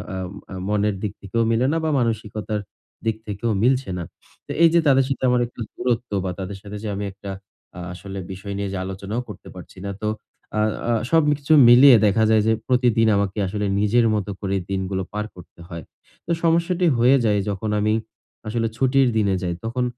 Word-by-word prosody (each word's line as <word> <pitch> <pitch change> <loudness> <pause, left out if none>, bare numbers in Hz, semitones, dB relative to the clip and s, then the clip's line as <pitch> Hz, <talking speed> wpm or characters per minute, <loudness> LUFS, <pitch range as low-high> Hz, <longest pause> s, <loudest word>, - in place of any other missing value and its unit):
আ - - -4 0.4
আ - - -6
মনের 105 -1 +1
দিক 105 -1 -2
থেকেও 100 +4 -2
মিলে 115 +3 +2
না - - +1
বা 160 - +1
মানসিকতার 110 -2 -2 0.4
দিক 110 -1 +1
থেকেও 105 +3 -3
মিলছে 130 -3 +2
না। 85 - -4 0.4
তো - - -7
এইযে 170 +1 +6
তাদের 135 -1 +5
সাথে 135 - -3
আমার 125 0 +3
একটু 120 - -19
দূরত্ব 120 -2 -2
বা 90 - -1
তাদের 95 +1 -5
সাথে 105 0 -8
যে - - -3
আমি 100 +1 -3
একটা 100 0 -8 0.5
আ - - -6
আসলে 95 +1 -8
বিষয় 100 +2 -6
নিয়ে 100 -1 -2
যে - - -2
আলোচনাও 100 +5 -4
করতে - - -10
পারছি - - -12
না। 100 - -3
তো 105 - -1 0.5
আ - - +2 0.3
আ - - +3 0.2
সবকিছু 150 -2 +2 0.2
মিলিয়ে 125 +1 +9
দেখা 110 +2 +3
যায় 110 -1 +4
যে 110 - +4
প্রতিদিন 120 -3 +3
আমাকে 100 +1 -1
আসলে 105 +2 -2
নিজের 115 +3 +3
মতো 100 -1 -2
করেই 95 -2 -1
দিনগুলো 95 0 -2
পার 105 0 -2
করতে 85 -1 -15
হয়। 85 -2 -7 0.4
তো 170 - -3
সমস্যাটি 170 +2 +2
হয়ে 125 +4 +5
যায় 105 -2 +2
যখন 100 +2 -3
আমি 105 +1 +1 0.5
আসলে 115 +1 0
ছুটির 135 0 +3
দিনে 100 -3 +2
যাই 85 - -1
তখন 125 +2 -1
110 Hz, 190 wpm, -22 LUFS, 100-125 Hz, 0.5 s, মিলিয়ে